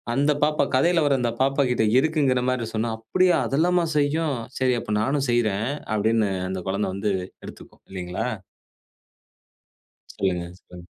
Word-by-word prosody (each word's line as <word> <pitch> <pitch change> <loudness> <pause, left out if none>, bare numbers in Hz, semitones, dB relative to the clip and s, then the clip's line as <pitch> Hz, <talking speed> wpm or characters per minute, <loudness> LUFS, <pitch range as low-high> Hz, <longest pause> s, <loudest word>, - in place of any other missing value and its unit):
அந்த 145 +2 +3
பாப்பா 150 -1 +2
கதைல 170 +6 +3
வர 140 - +3
அந்த 120 -1 0
பாப்பா 135 +1 +2
கிட்ட 110 -2 +2
இருக்குங்குற 140 -4 +1
மாரி 125 -3 -1
சொன்னா, 115 +1 -1
"அப்படியா! 180 +10 +2
அதெல்லாம 170 +4 +2
செய்யும். 145 -1 +1 0.2
சரி, 130 -1 +2
அப்ப 105 - -4
நானும் 135 +3 0
செய்றேன்." 110 -1 +1 0.3
அப்படீன்னு 110 0 +2 0.2
அந்த 95 0 -4
கொழந்த 100 +2 -1
வந்து 105 +1 -1 0.3
எடுத்துக்கும், - - -13
இல்லிங்களா? 90 +4 -4 1.8
சொல்லுங்க, 90 -2 -2
சொல்லுங்க. 90 -1 -13
125 Hz, 135 wpm, -24 LUFS, 105-145 Hz, 1.8 s, அந்த